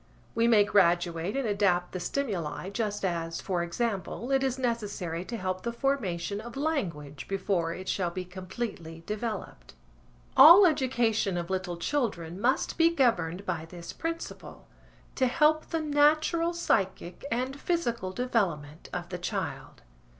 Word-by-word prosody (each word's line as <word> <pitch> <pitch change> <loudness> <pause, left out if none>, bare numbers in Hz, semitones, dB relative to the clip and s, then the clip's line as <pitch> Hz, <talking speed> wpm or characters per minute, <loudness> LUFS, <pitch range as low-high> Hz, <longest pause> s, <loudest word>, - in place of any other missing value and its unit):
We 230 0 +2
may 220 -3 +6
graduate 175 0 +2
and 270 -4 0
adapt 195 -4 +1
the 185 - -4
stimuli 185 - -3
just 205 -2 -2
as, 165 -2 -2
for 180 -3 -1
example, 215 +6 -3
it 270 0 +3
is 265 -1 0
necessary 205 -9 -2
to 235 - -5
help 185 -2 -3
the 235 - -2
formation 210 -8 -1
of 235 +3 -9
language 170 - -3
before 190 -4 -1
it 185 0 -8
shall 180 -3 0
be 185 +1 -5
completely 185 -3 -6
developed. 215 +1 -5 0.6
All 335 +9 +10
education 240 - +1
of 170 +1 -4
little 185 -2 -2
children 185 - -2
must 255 +7 +1
be 330 0 +6
governed 200 - +1
by 170 -4 -3
this 170 0 -9
principle–to 330 -5 -5
help 310 +4 +3
the 325 -1 -2
natural 310 +3 +2
psychic 190 - -1
and 255 +4 -2
physical 235 - -1
development 180 -11 -2
of - - -5
the - - -5
child. - - -5
205 Hz, 140 wpm, -28 LUFS, 175-260 Hz, 0.6 s, All